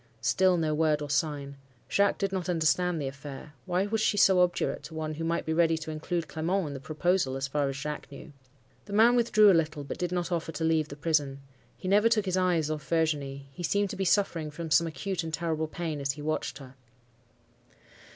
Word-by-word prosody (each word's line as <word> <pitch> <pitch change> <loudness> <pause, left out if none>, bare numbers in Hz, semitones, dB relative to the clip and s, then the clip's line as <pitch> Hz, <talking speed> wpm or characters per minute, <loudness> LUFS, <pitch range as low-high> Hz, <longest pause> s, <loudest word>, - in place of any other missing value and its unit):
"Still 185 +9 +3
no 160 -2 0
word 155 -1 +2
or 145 -1 -5
sign. 140 -1 -1 0.3
Jacques 200 0 +2
did 195 -1 -1
not 185 -2 -3
understand 170 +1 +1
the 140 - -2
affair. 140 +2 -9
Why 180 +2 +1
was 220 +1 -1
she 215 - +2
so 190 -2 +5
obdurate 180 -1 0
to 160 - -10
one 155 -1 -3
who 160 +2 -5
might 165 +1 -1
be 160 - -1
ready 165 0 +3
to 160 0 -6
include 160 +1 -3
Clement 170 +6 -1
in 145 - -5
the 135 - -6
proposal, 155 -1 0
as 135 0 -2
far 140 0 0
as 135 - -4
Jacques 150 +1 -5
knew? 145 +2 -11 0.5
"The 200 - -8
man 230 +3 +6
withdrew 215 -3 +5
a - - +5
little, 155 -3 0
but 140 - -7
did 180 -1 -2
not 180 0 -2
offer 165 -1 -2
to 160 - -4
leave 160 -2 +2
the 140 - -8
prison. 145 -3 0 0.4
He 185 - -7
never 205 +4 +4
took 215 -3 +2
his 185 -1 0
eyes 175 -4 +1
off 150 -2 -5
Virginie; 145 -4 -1
he 140 - -10
seemed 200 +3 0
to - - -5
be 195 - -2
suffering 175 -5 +1
from 160 +2 -7
some 165 +2 +4
acute 180 +2 -3
and 160 - -5
terrible 160 -1 -1
pain 155 -2 -4
as 140 0 0
he 145 - -9
watched 155 +1 -2
her. 135 -2 -12
160 Hz, 225 wpm, -28 LUFS, 150-180 Hz, 0.5 s, man